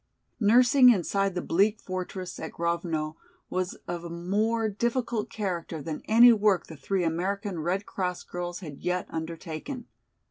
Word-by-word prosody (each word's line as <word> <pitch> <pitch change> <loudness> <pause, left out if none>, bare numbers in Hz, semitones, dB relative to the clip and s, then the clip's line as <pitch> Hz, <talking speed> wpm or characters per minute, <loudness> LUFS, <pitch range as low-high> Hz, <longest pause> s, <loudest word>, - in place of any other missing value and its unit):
Nursing 245 +4 +6
inside 195 -2 +2
the 180 - -2
bleak 205 +5 +2
fortress 185 0 -5
at - - -6
Grovno 165 -2 -2 0.3
was 185 0 -1
of 175 -1 -4
a 170 - -6
more 210 +7 0
difficult 235 +1 -1
character 175 -6 -3
than 150 +1 -5
any 235 +2 +8
work 205 -4 +2
the 160 - -10
three 180 +6 -1
American 185 +3 -1
Red 180 +5 -1
Cross 180 -2 -3
girls 175 +1 -5
had 150 -6 -8
yet 180 0 -1
undertaken. 165 - -5
185 Hz, 145 wpm, -28 LUFS, 170-210 Hz, 0.3 s, any